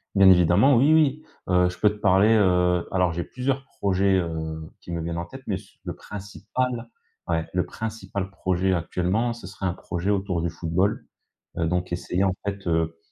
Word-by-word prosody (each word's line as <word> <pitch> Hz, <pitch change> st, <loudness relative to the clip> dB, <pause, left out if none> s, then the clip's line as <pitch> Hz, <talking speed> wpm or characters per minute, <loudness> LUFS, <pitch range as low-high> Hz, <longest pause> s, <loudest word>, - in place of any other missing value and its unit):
Bien 95 Hz, -1 st, +7 dB
évidemment 90 Hz, -, +5 dB
oui, 145 Hz, +5 st, +5 dB
oui. 155 Hz, -1 st, +3 dB, 0.3 s
Heu, 90 Hz, 0 st, +4 dB
je 90 Hz, -, -9 dB
peux 105 Hz, -, +4 dB
te 105 Hz, -, -6 dB
parler, 100 Hz, +1 st, +4 dB
heu 90 Hz, -4 st, +3 dB
alors 90 Hz, -2 st, +2 dB
j'ai 85 Hz, +1 st, -3 dB
plusieurs 135 Hz, +1 st, -2 dB
projets, 100 Hz, 0 st, +2 dB
heu, 80 Hz, -2 st, -4 dB
qui -, -, -10 dB
me 85 Hz, -, -2 dB
viennent 85 Hz, +1 st, -3 dB
en 85 Hz, -, -3 dB
tête, -, -, -11 dB
mais -, -, -1 dB
s -, -, -11 dB
le -, -, -4 dB
principal, 115 Hz, +4 st, -4 dB, 0.4 s
ouais, 80 Hz, -1 st, 0 dB
le 90 Hz, -1 st, +1 dB
principal 100 Hz, -1 st, -5 dB
projet 95 Hz, 0 st, 0 dB
actuellement, 90 Hz, +7 st, 0 dB
ce 115 Hz, -4 st, -11 dB
serait 95 Hz, 0 st, -6 dB
un 90 Hz, -, +1 dB
projet 90 Hz, +1 st, -4 dB
autour 95 Hz, -4 st, 0 dB
du 85 Hz, -, -1 dB
football. 85 Hz, +5 st, -1 dB, 0.5 s
Heu, 85 Hz, -, +1 dB
donc 90 Hz, +1 st, -1 dB
essayer 90 Hz, +1 st, -1 dB
en 95 Hz, -1 st, +2 dB
fait, 100 Hz, -1 st, -4 dB
heu, 80 Hz, 0 st, 0 dB
95 Hz, 190 wpm, -25 LUFS, 85-105 Hz, 0.5 s, Bien